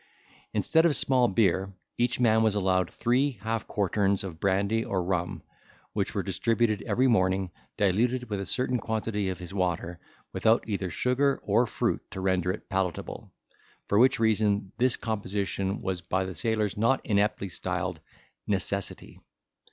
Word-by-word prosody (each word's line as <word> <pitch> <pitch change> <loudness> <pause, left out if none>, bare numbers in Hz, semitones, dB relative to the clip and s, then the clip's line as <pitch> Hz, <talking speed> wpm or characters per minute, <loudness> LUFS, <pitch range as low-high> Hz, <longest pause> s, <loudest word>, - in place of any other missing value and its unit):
Instead 160 - +2
of 165 -4 +4
small 125 -2 +4
beer, 95 -2 +1 0.2
each 120 +2 0
man 110 -2 +4
was 110 -2 +2
allowed 95 -3 +1
three 130 +4 +1
half 115 -1 -2
quarterns 100 0 0
of 85 -4 -7
brandy 100 +4 +1
or 95 -4 -1
rum, 90 -1 -2 0.5
which - - -2
were - - 0
distributed 115 -2 0
every 130 - +2
morning, 95 -5 +2 0.3
diluted 120 +6 +1
with 100 -2 -3
a - - -4
certain 125 +2 0
quantity 110 -3 -2
of 95 - -3
his 90 +2 -9
water, 90 -2 -2 0.3
without 110 0 +2
either 100 -4 -2
sugar 135 +7 +1
or 115 +4 +2
fruit - - -1
to - - -7
render 95 -1 +1
it 105 - -7
palatable, 95 -4 -3 0.6
for 100 - +3
which 130 0 +5
reason, 105 -3 +1
this 125 0 +4
composition 100 -2 -2
was 95 -2 -2
by 95 +2 -1
the 95 - -5
sailors 110 +2 -1
not 115 +5 +2
ineptly 100 -1 +1
styled 90 - -3 0.5
Necessity. 100 -1 -2
100 Hz, 150 wpm, -27 LUFS, 95-115 Hz, 0.6 s, which